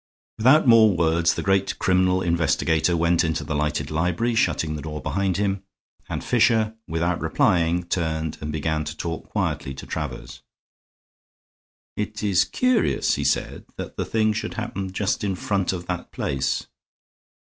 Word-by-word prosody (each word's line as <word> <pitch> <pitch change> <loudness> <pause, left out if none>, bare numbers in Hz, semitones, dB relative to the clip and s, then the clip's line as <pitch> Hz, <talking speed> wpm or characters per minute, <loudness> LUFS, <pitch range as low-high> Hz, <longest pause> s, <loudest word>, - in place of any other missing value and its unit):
Without 130 +6 +5
more 110 -5 +6
words 85 +1 +2
the - - -3
great 95 0 +1
criminal 95 0 +2
investigator 85 0 +1
went 85 +1 +2
into 80 -2 -1
the - - -4
lighted 75 +1 -1
library, 90 +9 0
shutting 80 -7 +1
the 75 - -5
door 75 0 -5
behind 95 0 -1
him, 100 -1 0 0.5
and - - -3
Fisher, 110 -2 +3
without 85 +2 -1
replying, 85 +1 +2
turned 80 -3 -2
and 75 0 -4
began 80 0 -1
to 75 +1 -6
talk 80 -1 -5
quietly 65 - -2
to 65 - -9
Travers. - - -6 1.5
"It 105 0 -4
is 95 -4 +3
curious," 255 -4 +1
he - - -1
said, - - -1
"that - - -7
the - - -2
thing 110 -1 +1
should 110 +3 -4
happen 100 -5 -4
just 100 +2 -1
in 100 -2 -1
front 95 0 -1
of 90 -2 -5
that 90 -1 -5
place." 65 -1 -1
90 Hz, 155 wpm, -24 LUFS, 80-105 Hz, 1.5 s, more